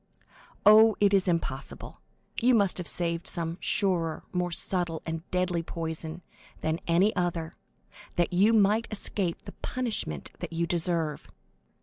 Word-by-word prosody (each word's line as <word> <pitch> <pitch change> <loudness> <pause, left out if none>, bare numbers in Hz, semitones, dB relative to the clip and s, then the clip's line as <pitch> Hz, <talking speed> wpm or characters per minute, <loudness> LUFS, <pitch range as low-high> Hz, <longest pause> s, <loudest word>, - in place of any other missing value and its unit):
Oh, 220 +1 +8
it 205 -1 +4
is 195 -1 +3
impossible—you 170 - -2
must 200 -4 +2
have 180 - -3
saved 170 -1 -2
some 170 0 -2
surer, 175 -5 0
more 180 -1 0
subtle 175 -1 0
and 165 +1 -5
deadly 180 -2 0
poison 165 0 -5 0.4
than 160 +1 -1
any 180 +6 +3
other, 175 -3 -2 0.6
that 175 0 +1
you 200 +5 +5
might 215 +1 +3
escape 200 -4 -1
the - - -9
punishment 220 - -3
that - - -6
you 170 +1 0
deserve. 165 -2 -1
175 Hz, 130 wpm, -28 LUFS, 165-200 Hz, 0.6 s, Oh